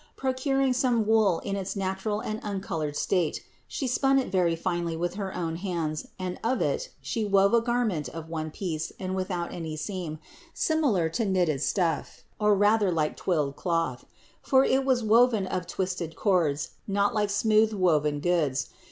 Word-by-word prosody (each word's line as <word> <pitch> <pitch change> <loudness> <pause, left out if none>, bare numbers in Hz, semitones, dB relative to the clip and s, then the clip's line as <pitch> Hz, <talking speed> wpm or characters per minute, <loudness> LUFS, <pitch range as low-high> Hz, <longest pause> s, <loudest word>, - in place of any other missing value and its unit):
Procuring 265 0 +1
some 245 -4 +2
wool 215 -5 +4
in 200 - -3
its 195 0 -4
natural 195 +2 -2
and 215 0 -4
uncolored 170 -7 -3
state, 175 -1 0 0.2
She 280 - -3
spun 270 +2 +2
it 265 - 0
very 175 -3 +2
finely 170 -1 -2
with 175 +1 -1
her 195 -1 -4
own 165 -2 -2
hands 165 -5 -3
and 185 -1 -4
of 250 +3 +1
it - - -1
She 225 - -2
wove 200 0 +3
a 235 - +5
garment 230 - 0
of 160 +3 -8
one 160 -1 -4
piece 160 -2 -4
and 185 0 -3
without 185 -2 -3
any 160 -2 -5
seam, 165 -1 -4 0.4
similar 280 - +2
to 225 +7 -1
knitted 175 -8 +1
stuff, 170 0 -1 0.2
or 210 -1 +4
rather 205 0 +3
like 155 -3 0
twilled 150 -6 -1
cloth; 165 -8 -1 0.4
for 265 0 +4
it 265 +1 +2
was 255 -3 +2
woven 225 -1 +4
of 180 -1 -3
twisted 180 -3 -3
cords, 165 -8 +1 0.2
not 200 +2 +1
like 210 -2 +1
smooth 215 +1 +3
woven 155 -7 +1
goods. 155 -6 +1
190 Hz, 170 wpm, -27 LUFS, 165-220 Hz, 0.4 s, a